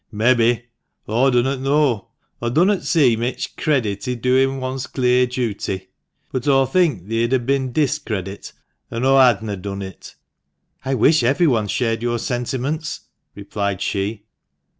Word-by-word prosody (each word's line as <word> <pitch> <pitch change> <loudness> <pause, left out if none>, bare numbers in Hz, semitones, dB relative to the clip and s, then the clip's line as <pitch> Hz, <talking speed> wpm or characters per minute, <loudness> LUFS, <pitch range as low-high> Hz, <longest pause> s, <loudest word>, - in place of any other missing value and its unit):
" - - -50
Mebbe. 120 +2 +2 0.4
Aw 120 +5 +3
dunnot 130 +2 +1
know. 135 -5 +1 0.3
Aw 120 - -1
dunnot 180 +9 +2
see 140 -9 +3
mich 120 +3 -3
credit 120 -11 -1
i' 125 - -1
doin' 130 +2 +2
one's 130 0 -4
clear 125 -1 +2
duty. 100 -6 -3 0.4
But 130 +1 -3
aw 135 -1 +4
think 135 - +1
theer'd 115 +3 0
ha' 120 - -9
bin 135 -1 0
discredit 120 - -2 0.4
an' 115 +2 -2
aw 135 0 +5
hadna 110 -5 +3
done 100 +1 -5
it." 95 -1 -10 0.3
" - - -45
I 135 0 0
wish 150 +6 +4
everyone 125 -3 +2
shared 115 +1 -1
your 120 0 0
sentiments," 130 +5 -3 0.3
replied 100 -1 -3
she. 100 +2 -3
125 Hz, 145 wpm, -20 LUFS, 110-135 Hz, 0.4 s, aw